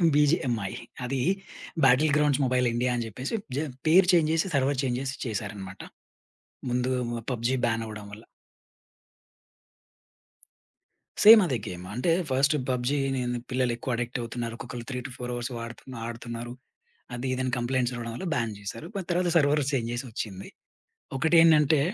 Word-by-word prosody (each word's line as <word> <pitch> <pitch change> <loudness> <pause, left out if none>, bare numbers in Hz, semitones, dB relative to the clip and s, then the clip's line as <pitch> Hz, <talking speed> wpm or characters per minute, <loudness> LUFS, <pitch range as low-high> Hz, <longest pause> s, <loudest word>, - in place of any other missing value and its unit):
BGMI. 135 - +2 0.3
అది 130 +2 -2 0.7
battle 140 +4 +5
grounds 145 -2 +2
mobile 125 0 +2
India 125 +1 +1
అని 120 -1 -2
జెప్పేసి 125 - -4 0.2
జ - - +1 0.3
పేరు 180 +3 +6
చేంజ్ 160 -3 +4
జేసి, 165 +3 +1
సర్వర్ 135 0 +1
చేంజ్ 125 -2 0
జేసి 135 0 -3
చేసారన్నమాట. 100 -4 -5 0.9
ముందు 125 +1 0 0.4
పబ్‌జి 120 +2 0 0.3
అవ్వడం 105 -1 -8
వల్ల. 110 +2 -11 3.0
సేమ్ 220 +1 +11
అదే 135 -7 0
గేమ్ 90 0 -6
అంటే 125 +9 +1 0.2
ఫస్ట్ 135 +3 +3
పబ్‌జి 125 +2 0
అని 135 -1 -1 0.3
పిల్లలెక్కువ 125 -1 -1
అడిక్ట్ 120 +2 -3
అవుతున్నారు. 115 0 -4
ఒక్కొక్కళ్ళు 120 0 -7
3-4 125 -1 -5
అవర్స్ 120 +1 -4
వాడుతు 115 0 -8 0.2
ఆడుతున్నారు 120 0 -6 0.6
అది 120 +2 -4
ఇది 130 - -2
అని 130 - -1
కంప్లెయింట్స్ 125 0 0
రావడం 115 -1 -5
వల్ల 190 - -5
బాన్ 115 -3 -1
జేశారు. 105 +9 -7
బట్ 195 -3 -3
తర్వాత 175 0 +1
సర్వర్ 150 0 +3
చేంజ్ 120 -5 -1
జేసి 120 +3 -3
ఒచ్చింది. 100 -3 -5 0.7
ఒకటేందంటే 160 0 +5
125 Hz, 135 wpm, -27 LUFS, 115-140 Hz, 3.0 s, సేమ్